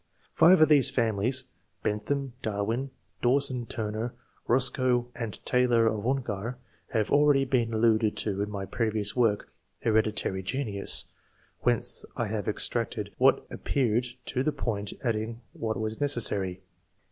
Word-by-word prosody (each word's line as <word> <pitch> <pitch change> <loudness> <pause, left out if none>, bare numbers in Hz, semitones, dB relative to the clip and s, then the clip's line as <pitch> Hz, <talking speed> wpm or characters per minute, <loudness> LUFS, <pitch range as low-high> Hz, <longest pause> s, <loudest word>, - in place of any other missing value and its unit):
Five 180 -1 +6
of 155 - +8
these 140 -3 +6
families 125 0 +1 0.4
(Bentham, 135 +5 -2
Darwin, 110 +5 -2 0.3
Dawson 125 -1 +1
Turner, 110 +2 -4 0.3
Eos 130 +2 +4
coe, 125 -2 0
and 115 -6 -6
Taylor 125 -2 +3
of 110 0 0
Ongar) 120 -3 -2 0.3
have 110 -5 -1
already 145 -1 +4
been 120 -3 +1
alluded 110 -1 +2
to 100 -2 -2
in 105 - -2
my 100 -2 -4
previous 110 -1 -1
work 115 -5 +1
('' - - -38
Hereditary 110 -3 +1
Genius 100 -1 0 0.3
"), - - -36
whence - - +3
I - - 0
have - - -3
extracted - - -2
what - - +4
appeared 125 -2 0 0.2
to 130 - -1
the 155 - +1
point, 110 -7 -3
adding 115 0 -2
what 110 -1 -3
was 110 +3 -3
necessary. 100 -9 0
115 Hz, 140 wpm, -28 LUFS, 105-130 Hz, 0.4 s, of